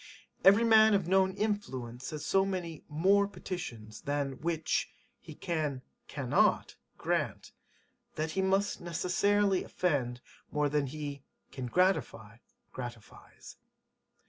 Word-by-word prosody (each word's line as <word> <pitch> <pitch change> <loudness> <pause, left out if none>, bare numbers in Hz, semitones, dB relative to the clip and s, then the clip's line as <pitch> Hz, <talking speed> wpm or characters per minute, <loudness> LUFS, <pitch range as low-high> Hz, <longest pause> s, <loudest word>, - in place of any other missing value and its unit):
Every 200 +4 +7
man 220 -2 +6
of 195 -4 0
known 190 0 +3
influence 130 - -3
has 150 -1 -6
so 195 0 +3
many 180 -5 -4
[more] 195 +7 +3
petitions 115 - -7
[than] 140 -2 -2
which 165 -1 -1 0.3
he - - -12
[can] 150 -6 -2 0.2
cannot - - +1 0.2
grant, - - -2 0.6
that 155 +1 -2
he 190 - 0
must 195 +2 +1
necessarily 190 +3 +1
offend 130 -9 -1 0.3
more 150 -1 +1
than 145 -1 0
he 145 0 -6 0.3
[can 130 -2 -5
gratify] 120 - 0 0.4
gratifies. 120 -3 -10
160 Hz, 115 wpm, -31 LUFS, 135-195 Hz, 0.6 s, Every